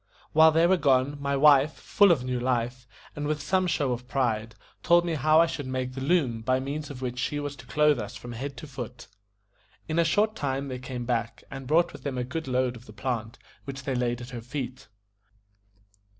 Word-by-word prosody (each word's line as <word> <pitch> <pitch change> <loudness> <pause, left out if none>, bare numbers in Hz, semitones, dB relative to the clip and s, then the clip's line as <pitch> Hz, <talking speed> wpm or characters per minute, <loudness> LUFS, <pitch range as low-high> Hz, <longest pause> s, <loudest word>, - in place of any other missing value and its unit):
While 160 +1 +7
they 165 +2 +4
were 185 +2 +4
gone, 140 -1 +2
my 140 0 0
wife, 145 +1 +6
full 205 -2 +4
of 145 -7 +2
new 125 -1 -2
life, 125 0 -1 0.3
and 145 0 -3
with 155 0 -1
some 185 +6 +1
show 145 -6 0
of 125 0 -4
pride, 115 -4 -1 0.3
told 175 +1 +4
me 170 - -1
how 155 +2 +4
I 165 - +7
should 145 -4 -5
make 130 0 -3
the 130 - -6
loom 135 -7 +1
by 130 +3 +1
means 145 +3 -4
of 130 -2 -8
which 125 0 -3
she 145 +3 -1
was 145 -1 -4
to 125 - -13
clothe 150 +2 +3
us 105 - -6
from 120 - -8
head 135 +4 -6
to - - -8
foot. 125 -3 -8 0.8
In 160 +1 0
a - - +5
short 210 +6 +2
time 140 -3 -2
they 130 -1 -5
came 125 -1 -5
back, 115 -2 -2
and 135 -1 -7
brought 170 +4 +3
with - - -10
them 140 -3 -4
a 125 - 0
good 155 +5 -5
load 125 -1 0
of 120 +1 -13
the 105 - -12
plant, 110 +1 -3 0.3
which 140 0 -6
they 135 - -2
laid 120 -1 -1
at 120 +2 -9
her 120 -2 -6
feet. 130 +1 -6
130 Hz, 220 wpm, -27 LUFS, 125-150 Hz, 0.8 s, While